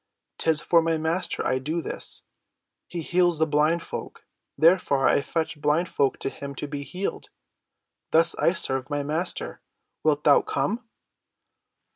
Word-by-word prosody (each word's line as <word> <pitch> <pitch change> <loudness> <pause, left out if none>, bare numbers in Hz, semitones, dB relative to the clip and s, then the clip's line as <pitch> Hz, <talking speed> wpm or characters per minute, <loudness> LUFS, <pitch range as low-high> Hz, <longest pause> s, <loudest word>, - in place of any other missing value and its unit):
'Tis 160 -2 +2
for 170 -1 +4
my 165 0 0
Master 160 +3 -1
I 130 - +1
do 155 +6 -2
this. - - -2 0.6
He 175 - -5
heals 175 -1 +2
blind 155 +2 +1
folk, - - -8 0.3
therefore 155 -4 +4
I - - +3
fetch 160 0 -3
blind 155 +4 +1
folk 140 -1 +1
to - - 0
him 140 0 -8
to 150 - -4
be 145 0 -5
healed. 185 +7 -5 0.8
Thus 165 +1 +5
I 170 - +3
serve 135 -6 -2
my 145 -1 -1
Master. 160 +5 -3 0.4
Wilt 150 -1 +2
thou 145 - +6
come?" 225 - -2
155 Hz, 145 wpm, -25 LUFS, 145-170 Hz, 0.8 s, thou